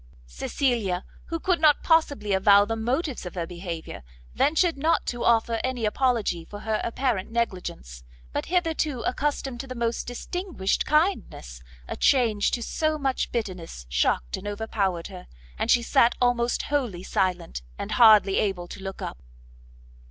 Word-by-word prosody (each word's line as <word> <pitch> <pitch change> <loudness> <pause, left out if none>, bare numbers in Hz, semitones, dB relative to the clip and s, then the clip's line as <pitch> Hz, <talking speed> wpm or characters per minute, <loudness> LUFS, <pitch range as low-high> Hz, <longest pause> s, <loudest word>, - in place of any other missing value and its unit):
Cecilia, 195 - -1 0.2
who 330 - -4
could 355 -1 0
not 300 -2 +5
possibly 285 - +2
avow 200 +1 +6
the 225 +2 -2
motives 255 +5 -2
of 180 - -9
her 170 -2 -2
behaviour, 170 - -7 0.3
ventured 325 +3 +2
not 315 +4 +1
to 240 0 -3
offer 230 0 +2
any 255 -3 -1
apology 215 -7 0
for 205 +5 -10
her 220 -1 -1
apparent 235 -5 -1
negligence; 180 - -4 0.3
but, - - -2
hitherto 325 -7 0
accustomed 270 -1 -2
to 270 - -6
the 255 - -6
most 235 -1 -2
distinguished 295 - -2
kindness, 300 - 0 0.3
a - - -4
change 230 -7 +3
to 240 - -2
so 310 +5 0
much 270 -3 -1
bitterness 185 - -5
shocked - - 0
and 205 - -8
overpowered 205 -4 -2
her, 180 -2 -10 0.3
and - - -1
she 240 - +4
sat 235 +1 +3
almost 245 -1 +1
wholly 245 -12 -2
silent, 180 - -1 0.2
and - - -5
hardly 215 -5 +6
able 190 -4 -1
to 195 - -9
look 195 0 -6
up. - - -6
230 Hz, 150 wpm, -25 LUFS, 190-270 Hz, 0.3 s, avow